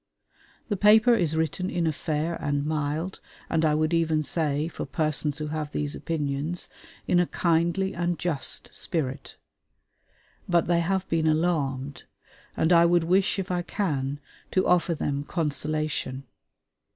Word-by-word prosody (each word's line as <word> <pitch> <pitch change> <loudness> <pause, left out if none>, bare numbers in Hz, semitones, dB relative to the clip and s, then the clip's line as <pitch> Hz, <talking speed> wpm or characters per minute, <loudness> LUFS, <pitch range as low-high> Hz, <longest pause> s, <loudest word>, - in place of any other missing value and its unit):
The 205 - 0
paper 215 +4 +6
is 170 -8 +2
written 160 +4 -1
in 170 -1 -1
a 160 - +2
fair 155 +2 -2
and 145 -2 -1
mild, 155 +4 -2 0.3
and 160 -1 +2
I 150 -1 +3
would 155 +2 +1
even 160 -2 +2
say, 150 0 -1
for 170 - -6
persons 150 0 +1
who 150 -1 -4
have 150 -1 -3
these 145 0 -2
opinions, 150 +1 -2 0.4
in 175 - +3
a 175 - +2
kindly 170 +3 +1
and 175 0 -1
just 155 -3 -2
spirit. 135 -4 -3 1.1
But 175 -1 +3
they 170 0 +2
have 190 +2 0
been 160 -1 +1
alarmed, 145 -4 0 0.5
and 160 +2 +3
I 170 0 +7
would 170 0 +4
wish, 185 +5 +2
if 190 -1 -3
I 175 -1 0
can, 145 -7 -2 0.3
to 185 - +1
offer 175 -1 +3
them 140 -1 -2
consolation. 155 -4 -2
160 Hz, 150 wpm, -26 LUFS, 150-175 Hz, 1.1 s, I